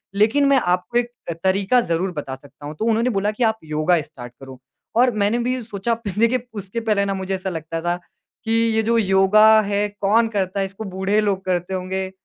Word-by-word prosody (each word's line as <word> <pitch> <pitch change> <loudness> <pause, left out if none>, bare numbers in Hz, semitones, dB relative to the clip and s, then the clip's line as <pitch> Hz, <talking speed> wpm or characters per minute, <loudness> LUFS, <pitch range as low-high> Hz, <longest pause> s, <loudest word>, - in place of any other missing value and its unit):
लेकिन 225 +8 +3
मैं 275 - +4 0.2
आपको 185 +7 -4
एक 240 0 0 0.3
तरीका 195 +6 +2
ज़रूर 180 +3 0
बता 140 -4 -5
सकता 140 +2 -15
हूँ। 150 +1 -7
तो 220 - -1
उन्होंने 230 +2 +2
बोला 205 +2 +1
कि 215 +3 -2
आप 220 -1 +2
योगा 155 +2 +1
स्टार्ट 125 -4 -11
करो। 130 -1 -11 0.4
और 245 +1 +4
मैंने 210 +3 +1
भी 250 +1 -1
सोचा 225 +1 -2 0.2
देखिए 235 +2 +1
उसके 195 +4 -5
पहले 215 -3 +1
ना 200 - -1
मुझे 190 0 -4
ऐसा 190 0 -4
लगता 165 -1 -5
था 175 +1 0 0.5
कि 225 - -1 0.2
ये 220 - +3
जो 230 +1 +2
योगा 215 +2 +5
है, 205 0 0
कौन 220 +3 +3
करता 200 -2 -2
है? 195 - +1
इसको 195 +3 -8
बूढ़े 195 +2 +1
लोग 195 -2 -1
करते 180 0 -1
होंगे। 190 +1 -3
200 Hz, 205 wpm, -21 LUFS, 185-225 Hz, 0.5 s, योगा